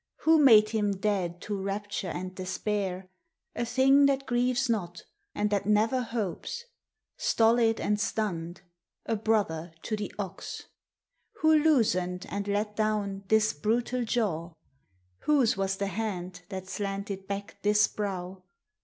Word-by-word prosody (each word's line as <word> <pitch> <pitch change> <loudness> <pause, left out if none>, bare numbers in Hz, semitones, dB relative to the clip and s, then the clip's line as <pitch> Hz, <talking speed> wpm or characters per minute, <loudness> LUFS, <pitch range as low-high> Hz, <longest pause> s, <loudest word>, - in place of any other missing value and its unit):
Who 320 0 +5
made 215 -5 +7
him 210 -2 0
dead 190 -3 -1
to 205 -2 -4
rapture 200 -1 -3
and 185 +1 -5
despair, 185 0 -3 0.5
A 235 - -1
thing 265 +4 +5
that 275 0 0
grieves 245 +1 +1
not 180 -7 -2 0.3
and 210 0 0
that 200 -1 0
never 220 +5 +3
hopes, 230 - -4 0.5
Stolid 225 0 +3
and 210 0 0
stunned, 180 -7 -2 0.4
a 225 - 0
brother 200 -7 0
to 220 - -2
the 210 -1 -5
ox? 200 -3 -6 0.8
Who 315 0 +5
loosened 210 - +2
and 200 0 -3
let 210 +1 -1
down 205 -2 -1
this 220 0 +3
brutal 240 +8 0
jaw? 185 -8 -1 0.7
Whose 275 -7 +3
was 195 0 -1
the 200 - -1
hand 185 -3 -4
that 190 -2 -6
slanted 195 -1 -4
back 200 0 -5
this 210 0 +4
brow? 190 -2 -4
205 Hz, 135 wpm, -28 LUFS, 190-225 Hz, 0.8 s, made